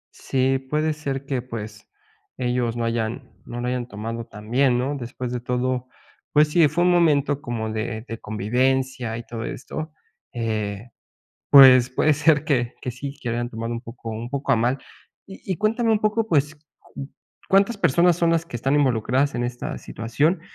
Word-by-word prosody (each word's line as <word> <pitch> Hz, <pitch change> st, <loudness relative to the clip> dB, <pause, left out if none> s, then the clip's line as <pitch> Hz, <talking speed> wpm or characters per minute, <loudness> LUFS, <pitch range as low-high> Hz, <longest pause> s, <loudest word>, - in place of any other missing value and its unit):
Sí, 135 Hz, 0 st, 0 dB
puede 150 Hz, +4 st, -1 dB
ser 140 Hz, -2 st, -4 dB
que 135 Hz, -3 st, -2 dB
pues, 110 Hz, -3 st, -8 dB, 0.5 s
ellos 120 Hz, -1 st, -1 dB
no 115 Hz, -, -1 dB
hayan 115 Hz, +2 st, -3 dB
no 120 Hz, -, -6 dB
lo 125 Hz, -, -2 dB
hayan 125 Hz, -1 st, -2 dB
tomado 115 Hz, +2 st, -5 dB
tan 105 Hz, +1 st, -11 dB
bien, 130 Hz, -1 st, +3 dB
¿no? 135 Hz, +4 st, -1 dB
Después 125 Hz, -1 st, -5 dB
de 125 Hz, -, -2 dB
todo, 125 Hz, +1 st, -1 dB, 0.5 s
pues 150 Hz, 0 st, +5 dB
sí, 160 Hz, -1 st, +5 dB
fue 175 Hz, +4 st, 0 dB
un 180 Hz, -, +4 dB
momento 145 Hz, -5 st, +3 dB
como 110 Hz, -3 st, -3 dB
de 110 Hz, +1 st, -4 dB
de 115 Hz, 0 st, -6 dB
convivencia 125 Hz, +3 st, -1 dB
y 120 Hz, -, -6 dB
todo 115 Hz, -1 st, -6 dB
esto. 155 Hz, +6 st, -6 dB, 0.4 s
Eh, 110 Hz, -2 st, -3 dB, 0.6 s
pues 130 Hz, -3 st, +9 dB
puede 150 Hz, +4 st, +2 dB
ser 150 Hz, 0 st, +3 dB
que 125 Hz, -6 st, 0 dB
que 125 Hz, -, -3 dB
sí 135 Hz, +3 st, -7 dB
que 120 Hz, -, -3 dB
lo 115 Hz, -, -1 dB
hayan 120 Hz, 0 st, -2 dB
tomado 115 Hz, 0 st, -5 dB
un 115 Hz, -, -3 dB
poco 115 Hz, -1 st, -9 dB
un 115 Hz, +2 st, -5 dB
poco 140 Hz, 0 st, -2 dB
a 125 Hz, -, +4 dB
mal. 120 Hz, +4 st, +1 dB, 0.5 s
Y 195 Hz, -, -12 dB
y -, -, -4 dB
cuéntame 225 Hz, +4 st, +1 dB
un 210 Hz, -, +2 dB
poco 215 Hz, +1 st, 0 dB
pues, 150 Hz, -3 st, +2 dB, 0.3 s
¿cu 135 Hz, -, -9 dB, 0.4 s
cuántas 200 Hz, +3 st, +3 dB
personas 175 Hz, 0 st, +3 dB
son 170 Hz, -1 st, +2 dB
las 165 Hz, -1 st, +1 dB
que 120 Hz, -, -6 dB
están 135 Hz, +4 st, +1 dB
involucradas 130 Hz, 0 st, +1 dB
en 120 Hz, 0 st, -1 dB
esta 120 Hz, 0 st, -5 dB
situación? 145 Hz, +10 st, -1 dB
130 Hz, 185 wpm, -23 LUFS, 115-145 Hz, 0.6 s, pues